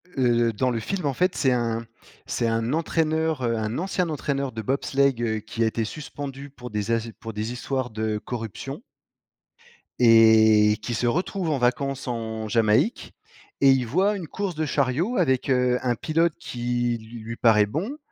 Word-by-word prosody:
Heu, 120 -3 +2
dans 125 +5 0
le 115 - -1
film 180 - -3
en 140 - +1
fait, 180 +6 +1
c'est 130 - +2
un 115 -2 -1 0.4
c'est 115 - -1
un 115 +1 0
entraîneur, 160 -2 0
heu, 115 -1 0
un 110 +2 -2
ancien 185 0 -1
entraîneur 140 -3 -2
de 110 - -4
bobsleigh, 140 +3 +1
heu, 110 -2 -1
qui 110 +2 -6
a - - +3
été 110 +1 -1
suspendu 140 +2 -7
pour 125 -2 -10
des 105 0 -2
az 115 0 -1
pour 115 0 -7
des 105 +2 -3
histoires 130 +1 -3
de 110 -1 -2
corruption 120 - -6 1.2
et 110 -2 +6
qui 120 - -4
se 120 +2 0
retrouve 180 - -1
en 145 - +1
vacances 130 +2 -1
en 110 -2 -4
Jamaïque 110 - +1 0.5
et 135 - +6
il 130 -2 +2
voit 190 - +1
une 180 -5 -6
course 195 -1 -4
de 155 +1 -1
chariot 150 - 0
avec, 135 -7 +1
heu, 125 -1 +3
un 125 -1 +1
pilote 165 +7 +1
qui 120 -1 -2 0.2
lui 115 +1 -6
paraît 110 -3 +4
bon. 185 - -4
125 Hz, 175 wpm, -24 LUFS, 115-145 Hz, 1.2 s, et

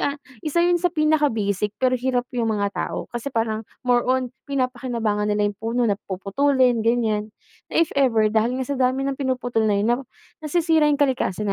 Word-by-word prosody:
ah, 285 0 -1 0.3
isa 340 +3 +2
yun 350 0 +3
sa 355 - +2
pinaka-basic 275 - 0
pero 255 -1 +1
hirap 250 0 0
yung 235 -2 0
mga 200 -1 -1
tao. - - -3
Kasi 240 +3 -4
parang 225 -3 -1 0.2
more 245 -1 +4
on 255 -1 0 0.2
pinapakinabangan 240 -6 -1
nila 210 0 +1
yung 200 - -30
puno 230 +2 0
na 205 -3 +1
puputulin 245 +6 +2
ganyan, 220 -2 +1 0.4
na - - -4
if - - -13
ever 225 -6 +2
dahil 225 +3 +1
nga 260 - -2
sa 280 +2 -3
dami 260 +1 +1
ng 275 0 -2
pinuputol 250 -4 -1
na 205 - +2
yun 205 +3 +1
'no, 240 - +1 0.4
nasisira 315 0 +2
yung 295 - +2
kalikasan 215 -7 0
245 Hz, 190 wpm, -23 LUFS, 220-275 Hz, 0.4 s, more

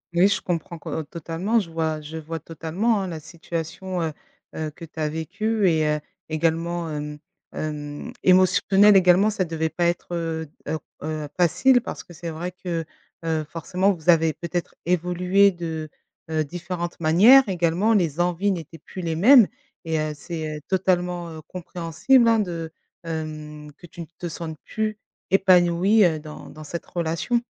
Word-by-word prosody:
Oui 180 +3 +6
je 200 - 0
comprends 170 -1 -3
qu - - -9
heu, 160 - -2
totalement, 170 +8 -1
je 170 -5 -5
vois 160 -1 -1
je 155 +2 -7
vois 160 +1 -5
totalement, 170 +8 -1
hein, 190 - -3
la 165 -3 -5
situation, 170 +3 -5
heu 155 -2 -2 0.4
heu, 155 -1 -3
que 165 +2 -11
tu 160 0 -12
as 155 -1 0
vécue 205 +6 -1
et 155 -2 +2
heu, - - -3 0.3
également, 165 +2 0
hem 150 0 -5 0.4
hem, 145 -1 -5
émotionnelle 190 +2 +5
également 190 +3 +5
ça 200 -3 0
devait 160 -1 -2
pas 175 +1 -1
être, 175 0 -1
heu 165 -2 -2 0.2
heu 160 - -1 0.2
heu, 155 -1 -4
facile 245 +9 +4
parce - - -6
que 175 - -14
c'est 170 +1 -6
vrai 170 +3 -4
que, 170 -3 -4 0.4
heu, 160 -1 0
forcément 185 +4 0
vous 175 -2 -7
avez 160 -1 +3
peut-être 175 0 -4
évolué 180 +3 +3
de, 160 -3 -5 0.4
heu, 155 -1 +1
différentes 175 +2 -5
manières, 205 +10 +7
également 180 +5 +2
les 170 -4 +1
envies 180 +3 +1
n'étaient 165 -2 -5
plus 185 - -9
les 165 -2 -2
mêmes 230 - +7 0.4
et 160 -1 -1
heu, 155 0 -1
c'est, 155 -1 -5
heu, - - -10
totalement, 180 -2 0
heu, 160 -1 -8
compréhensible, 180 - +1
hein, 230 -1 +5
de, 170 -5 -3 0.3
hem 155 -2 -6
que 175 - -12
tu 170 - -10
ne - - -6
te 175 - -4
sentes 160 -1 -6
plus 215 -1 -3 0.3
épanouie, 190 +2 +5
heu, 160 -3 +1
dans 150 0 -10
dans 155 - -10
cette 170 +3 -6
relation. 170 +8 -1
170 Hz, 170 wpm, -24 LUFS, 160-185 Hz, 0.4 s, manières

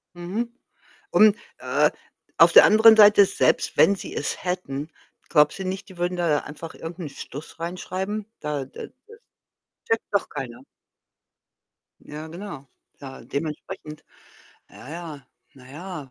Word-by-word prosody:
Mhm, 205 +8 -4 0.6
und, 215 -1 +6 0.2
äh, - - +2 0.5
auf - - +7
der - - +10
anderen 220 +1 +7
Seite, 205 -1 +8
selbst - - 0
wenn 200 - +6
sie - - -9
es - - -4
hätten, 160 -5 -3 0.4
glaubst 150 +2 +3
du 190 - -4
nicht, 195 +2 -5
die 185 - -14
würden 180 +1 -2
da 165 -4 +2
einfach 160 +2 -9
irgend 165 +2 -8
'n 165 -4 -5
Stuss 140 +3 -10
reinschreiben? 185 +4 -4 0.2
Da 150 -3 -3
d 130 - -10 0.2
das 450 0 -15 0.7
checkt 225 0 +1
doch 200 - +1
keiner. 130 -5 -7 1.4
Ja, 150 +1 -9
genau. 165 -4 -8 0.3
Ja, 135 -1 -10
dementsprechend, 150 +2 -6 0.7
ja, - - -14
ja, 160 -2 -7 0.3
na 130 -1 -16
ja. 155 -2 -8
170 Hz, 140 wpm, -24 LUFS, 150-195 Hz, 1.4 s, der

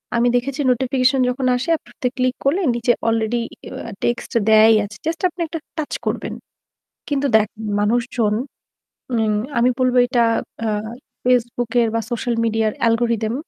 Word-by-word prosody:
আমি 235 +1 +3
দেখেছি 270 +4 -1
নোটিফিকেশন 260 +1 +2
যখন 255 +1 -2
আসে 250 +7 -3
আপনি - - -21 0.3
ক্লিক 255 0 +1
করলে 340 +8 +2
নিচে 240 +1 +2 0.2
অলরেডি 225 +1 +1 0.3
এ্যা 230 - -7
টেক্সট 240 0 -1 0.2
দেয়াই 220 +1 +7
আছে। 210 +1 -11
জাস্ট 325 0 -2
আপনি 345 - -8
একটা 325 +1 -5 0.2
টাচ 310 -2 -3
করবেন। - - -2 0.8
কিন্তু 285 -1 0
দেখ 215 -1 +2 0.3
মানুষজন, 225 0 +1 0.8
মিন 220 -1 +1 0.3
আমি 245 +2 +4
বলব 255 -1 +2
এটা 245 -2 +2 0.4
আ - - 0 0.6
FaceBook 245 -1 +1
এর 230 - +2
বা 230 - +1
সোশ্যাল 240 0 -1
মিডিয়া 225 -1 +1 0.2
অ্যালগরিথম। 230 -1 +1
240 Hz, 145 wpm, -20 LUFS, 225-255 Hz, 0.8 s, দেয়াই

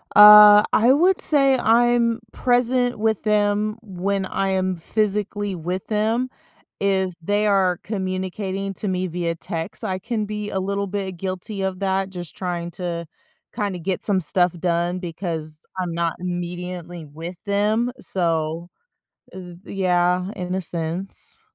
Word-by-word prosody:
Uh, 210 0 +10
I 235 +4 +5
would 355 +6 +4
say 275 -3 +4
I'm 235 0 +3
present 245 0 +1
with 220 -1 0
them 210 0 +1
when 195 0 -2
I 195 +1 -1
am 185 -1 0
physically 205 +2 -1
with 180 +3 -4
them, 225 +4 0 0.5
if 190 -2 +1
they 205 +4 +1
are 190 -4 +3
communicating 190 0 -3
to 205 - -4
me 185 0 -1
via 170 -1 -2
text, 165 +5 -6
I 190 -3 -2
can 215 +1 -2
be 210 0 -4
a 190 - -2
little 200 +1 -2
bit 195 -1 -3
guilty 190 +2 -5
of 190 -1 -2
that, 195 0 0
just 175 -4 -8
trying 175 -2 -4
to 170 -1 -4 0.5
kinda 200 -3 -2
get 185 +2 -2
some 200 -3 +1
stuff 180 +1 +1
done, 175 0 0
because 165 -3 -5
I'm 180 -2 -2
not 170 -1 0
immediately 175 -1 -5
with 165 +5 -8
them, 215 +4 +1
so 165 -1 -1 0.6
th 180 -2 -10
yeah, 180 -1 +1
in 180 0 -3
a 190 - 0
sense. 175 - -5
190 Hz, 140 wpm, -22 LUFS, 175-210 Hz, 0.6 s, Uh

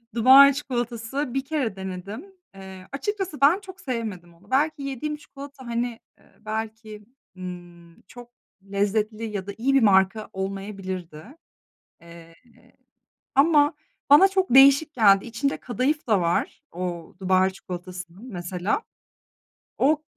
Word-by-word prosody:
Dubai 270 +4 +8
çikolatası, 245 0 -3
bir 270 0 -2
kere 270 -9 -2
denedim. 190 - -7 0.3
Eee, 190 -1 -11
açıkçası 375 +2 -4
ben 300 +7 +5
çok 375 -2 -13
sevmedim 215 -9 -5
onu. 185 +5 -23
Belki 290 +2 +1
yediğim 275 +2 -4
çikolata, 280 -3 -12
hani, 235 0 -3 0.2
ııı, - - -26
belki, 220 -1 -6 0.3
ııı, 175 -2 -10
çok 245 -1 -13 0.4
lezzetli 210 +2 -1
ya 200 -3 -5
da - - -4
iyi 270 +4 +1
bir 270 - +5
marka 195 +1 +3
olmayabilirdi, 190 -4 -6 0.8
eee, 170 0 -14 1.0
ama 295 +1 +4 0.4
bana 295 +7 +8
çok 380 -8 0
değişik 275 +3 +7
geldi. 200 -4 +5
İçinde 235 +4 -2
kadayıf 255 +5 -2
da 210 -5 +3
var 170 0 -1
o 175 -1 -5
Dubai 190 0 +2
çikolatasının 185 +1 -9
mesela. 180 - -2 1.0
O, 300 +3 +2
220 Hz, 120 wpm, -24 LUFS, 190-275 Hz, 1.0 s, Dubai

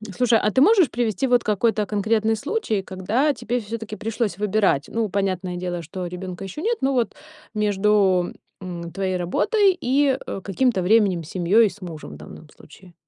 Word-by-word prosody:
Слушай, 240 -1 +3
а 210 - +1
ты 260 - +2
можешь 370 - +5
привести 235 +1 -1
вот 245 -1 +3
какой-то 215 +1 +1
конкретный 220 +2 +1
случай, 275 - -2
когда 205 +11 0
тебе 245 -2 -2
всё-таки 225 0 -6
пришлось 220 -2 -2
выбирать. 205 -8 +1
Ну, 225 -2 -1
понятное 185 -2 -2
дело, 175 -1 -3
что 180 +3 -6
ребенка 180 +1 -7
еще 195 +11 -7
нет, 465 +5 0
но 270 +1 +1
вот 240 -4 0 0.4
между, 205 -3 +2 0.3
м, 170 -2 -6
твоей 190 0 -2
работой 385 - +2
и, 270 +1 +2
э, 195 - -5
каким-то 215 +1 +1
временем 195 -3 +3
с 155 - -12
семьей, 195 +5 +3
с 205 - -15
мужем 165 - -8
в - - -10
данном 75 - -12
случае. 175 +4 -17
210 Hz, 175 wpm, -23 LUFS, 185-235 Hz, 0.4 s, можешь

